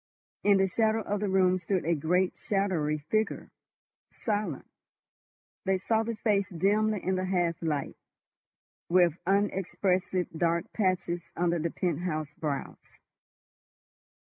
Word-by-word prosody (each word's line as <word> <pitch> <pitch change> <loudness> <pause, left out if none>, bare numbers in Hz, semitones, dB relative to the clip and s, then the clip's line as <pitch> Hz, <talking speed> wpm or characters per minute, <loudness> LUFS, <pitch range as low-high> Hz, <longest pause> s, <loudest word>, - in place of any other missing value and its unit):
In 205 -1 +5
the 190 0 +3
shadow 220 +3 +1
of 205 +1 -2
the 205 -1 -1
room 185 -1 +3
stood 185 -1 -1
a 170 - +2
great 180 +4 +1
shadowy 185 -7 0
figure—silent. 205 - -4 1.0
They 190 0 +2
saw 220 +4 +1
the 230 +1 -3
face 205 -3 +1
dimly 205 +4 +1
in 190 0 0
the 185 - -1
half 175 -3 0
light, 150 -4 -2 0.9
with 175 -2 +4
unexpressive 190 -2 +1
dark 170 +1 0
patches 175 -4 -1
under 175 0 +1
the 165 +2 -1
penthouse 155 -3 -2
brows. 145 -2 -5
185 Hz, 115 wpm, -29 LUFS, 170-200 Hz, 1.0 s, In